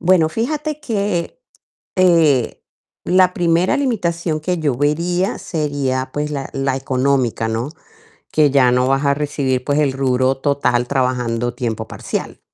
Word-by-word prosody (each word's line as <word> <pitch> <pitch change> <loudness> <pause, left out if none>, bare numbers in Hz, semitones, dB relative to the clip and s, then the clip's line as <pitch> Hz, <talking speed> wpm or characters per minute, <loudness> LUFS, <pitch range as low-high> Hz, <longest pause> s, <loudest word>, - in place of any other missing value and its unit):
Bueno, 170 -3 +4
fíjate 300 - -2
que, 205 - -2 0.6
eh, 165 - +3 0.4
la 185 0 +4
primera 170 +1 +2
limitación 170 - -1
que 180 +3 -1
yo 150 -5 0
vería 170 +7 0
sería, 140 -5 -2
pues, 150 0 -2
la 140 -2 -4
la 135 -1 -1
económica, 130 -3 0
¿no? 115 +6 -2 0.6
Que 150 -2 +3
ya 130 -3 +4
no 125 +1 +2
vas 135 +2 +1
a 140 0 +3
recibir 140 -3 -1
pues 145 0 +1
el 145 -3 +2
rubro 130 0 +1
total 135 -4 +1
trabajando 125 -3 -1
tiempo 120 -3 -3
parcial. - - -5
145 Hz, 140 wpm, -19 LUFS, 130-170 Hz, 0.6 s, Bueno